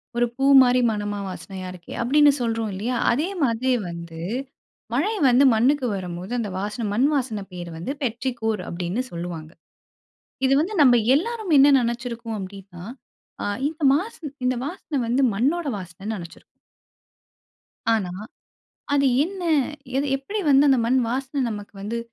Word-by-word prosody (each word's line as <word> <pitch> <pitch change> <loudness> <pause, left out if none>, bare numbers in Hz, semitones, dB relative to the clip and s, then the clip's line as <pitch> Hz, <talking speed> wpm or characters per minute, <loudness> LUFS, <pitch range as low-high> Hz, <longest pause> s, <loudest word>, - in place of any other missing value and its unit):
ஒரு 240 0 +3
பூ 270 +1 0 0.2
மாதிரி 250 0 +3
மனமா 205 -1 -3
வாசனையா 185 0 -7
இருக்கே! 175 -2 -11
அப்பிடின்னு 290 +4 +5
சொல்றோம் 225 -2 -1
இல்லயா! 235 +6 -2 0.2
அதே 295 +9 0
மாதிரியே 250 +1 +1
வந்து 170 -1 -8 0.7
மழை 345 - +1 0.2
வந்து 250 +3 +5
மண்ணுக்கு 260 +4 +2
வரம்போது, 180 +2 -6
அந்த 215 -3 -2
வாசனை 210 +3 -3
மண்வாசனை 255 -4 +1
பெயர் 175 -1 -7
வந்து 175 +11 -4
பெற்றிகோர் 230 -3 -2
அப்பிடின்னு 180 +8 -2
சொல்வாங்க. 170 -2 -6 1.0
இது 270 - +4
வந்து 390 +7 -2
நம்ப 250 -3 +7 0.2
எல்லாரும் 435 -1 -1
என்ன 275 - +7
நினைச்சுருக்கோம் 235 -1 -3
அப்பிடின்னா, 190 -2 -9 0.6
அ - - -2 0.2
இந்த 315 +1 -9
வாசன, 320 -4 -3
இந்த 255 - +2
வாசனை 325 -2 -5
வந்து 250 +4 +1
மண்ணோட 295 - 0
வாசனன்னு 195 +4 -6
நினைச்சிருக்கோம். 170 -2 -11 1.5
ஆனா, 195 -5 -1 0.8
அது 280 -1 +3 0.2
என்ன 375 +2 -6 0.5
எது 280 +2 +1
எப்பிடி 400 +11 -4
வந்து 280 +1 +6
அந்த 265 -2 +5
மண்வாசன 260 +3 0
நமக்கு 205 -1 -7
வந்து 225 +4 -3
235 Hz, 135 wpm, -23 LUFS, 200-275 Hz, 1.5 s, நம்ப